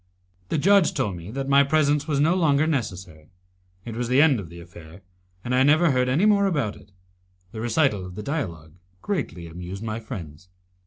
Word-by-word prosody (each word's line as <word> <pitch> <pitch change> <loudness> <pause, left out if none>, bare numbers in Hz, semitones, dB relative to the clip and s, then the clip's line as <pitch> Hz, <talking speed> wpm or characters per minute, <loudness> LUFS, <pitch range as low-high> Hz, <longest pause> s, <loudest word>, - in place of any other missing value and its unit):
The - - 0
judge 195 +3 +3
told 100 -3 -1
me 85 +2 -9
that 135 +4 -4
my 140 0 +5
presence, 150 0 +1
was 145 -3 0
no 155 +4 +3
longer 155 -5 +2
necessary. 95 - -4 0.6
It 115 -2 -6
was 120 0 -2
the 130 +3 +3
end 145 -5 +4
of 90 -5 -8
the 85 +1 -11
affair, 85 +1 -14 0.4
and 125 - -3
I 125 - +3
never 155 +4 +4
heard 125 -1 +1
any 155 +10 +2
more 200 -2 +4
about 140 - -1
it. 100 - -18 0.6
The 110 - -7
recital 120 -4 +1
of 90 0 -9
the 105 - -6
dialogue 85 - -5 0.3
greatly 135 - -3
amused 90 +4 -8
my 110 0 -4
friends. 90 - -9
125 Hz, 195 wpm, -24 LUFS, 90-150 Hz, 0.6 s, my